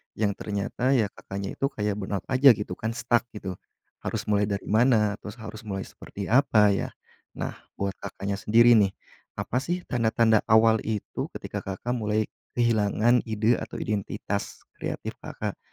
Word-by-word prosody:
yang 105 Hz, -1 st, +1 dB
ternyata 110 Hz, +6 st, 0 dB
ya 105 Hz, -5 st, +2 dB
Kakaknya 100 Hz, 0 st, -6 dB
itu 135 Hz, -, +2 dB
kayak 105 Hz, -5 st, -2 dB
burnout 95 Hz, -1 st, -3 dB
aja 130 Hz, -1 st, +7 dB
gitu 105 Hz, -3 st, -5 dB
kan, 115 Hz, +1 st, -2 dB
stuck 120 Hz, 0 st, +1 dB
gitu. 95 Hz, -3 st, -6 dB, 0.4 s
Harus -, -, -3 dB
mulai 105 Hz, -1 st, +2 dB
dari 100 Hz, -1 st, -2 dB
mana, 110 Hz, -3 st, +3 dB
terus 105 Hz, +1 st, -8 dB
harus 110 Hz, -1 st, -9 dB
mulai 95 Hz, -1 st, -3 dB
seperti 100 Hz, +2 st, -8 dB
apa 110 Hz, -6 st, +5 dB
ya, 100 Hz, -, 0 dB, 0.5 s
nah -, -, -5 dB, 0.2 s
buat 100 Hz, 0 st, -1 dB
Kakaknya 100 Hz, 0 st, -4 dB
sendiri 115 Hz, +4 st, +5 dB
nih, 100 Hz, -2 st, +2 dB, 0.4 s
apa 105 Hz, +5 st, -1 dB
sih 175 Hz, +5 st, -2 dB
tanda-tanda 115 Hz, -4 st, +3 dB
awal 110 Hz, 0 st, +5 dB
itu 105 Hz, -2 st, -3 dB
ketika -, -, -5 dB
Kakak 100 Hz, +5 st, -4 dB
mulai 110 Hz, -2 st, +1 dB, 0.3 s
kehilangan 115 Hz, 0 st, +3 dB
ide 110 Hz, +2 st, +2 dB
atau -, -, -7 dB
identitas 100 Hz, -1 st, -3 dB, 0.2 s
kreatif, -, -, -4 dB
Kakak? -, -, -5 dB
110 Hz, 155 wpm, -26 LUFS, 100-120 Hz, 0.5 s, aja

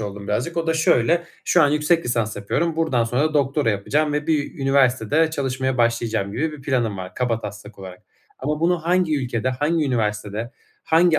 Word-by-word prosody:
oldum 100 Hz, -1 st, -6 dB
birazcık. 125 Hz, +11 st, -2 dB
O 165 Hz, 0 st, -1 dB
da 165 Hz, -, +1 dB
şöyle: 160 Hz, +1 st, +2 dB, 0.2 s
Şu 175 Hz, -, +4 dB
an 145 Hz, -, +5 dB
yüksek 150 Hz, +3 st, +2 dB
lisans 115 Hz, -3 st, -1 dB
yapıyorum, 155 Hz, +11 st, -1 dB
buradan 155 Hz, -8 st, +1 dB
sonra 140 Hz, +7 st, 0 dB
doktora 140 Hz, -3 st, +2 dB
yapacağım 145 Hz, +9 st, 0 dB
ve 150 Hz, 0 st, -2 dB
bir 150 Hz, -2 st, -1 dB
üniversitede 135 Hz, +2 st, +2 dB
çalışmaya 130 Hz, -3 st, -2 dB
başlayacağım 115 Hz, -4 st, 0 dB
gibi 155 Hz, +7 st, -1 dB
bir 150 Hz, -, -10 dB
planım 120 Hz, -7 st, 0 dB
var 95 Hz, 0 st, -7 dB
kabataslak 105 Hz, -4 st, -4 dB
olarak 95 Hz, -1 st, -10 dB, 0.4 s
ama 150 Hz, +3 st, -2 dB
bunu 175 Hz, +1 st, +2 dB
hangi 175 Hz, -3 st, +2 dB
ülkede, 125 Hz, -2 st, -2 dB
hangi 150 Hz, +5 st, 0 dB
üniversitede, 105 Hz, -2 st, -2 dB, 0.3 s
hangi 165 Hz, 0 st, +4 dB
130 Hz, 170 wpm, -22 LUFS, 115-155 Hz, 0.4 s, an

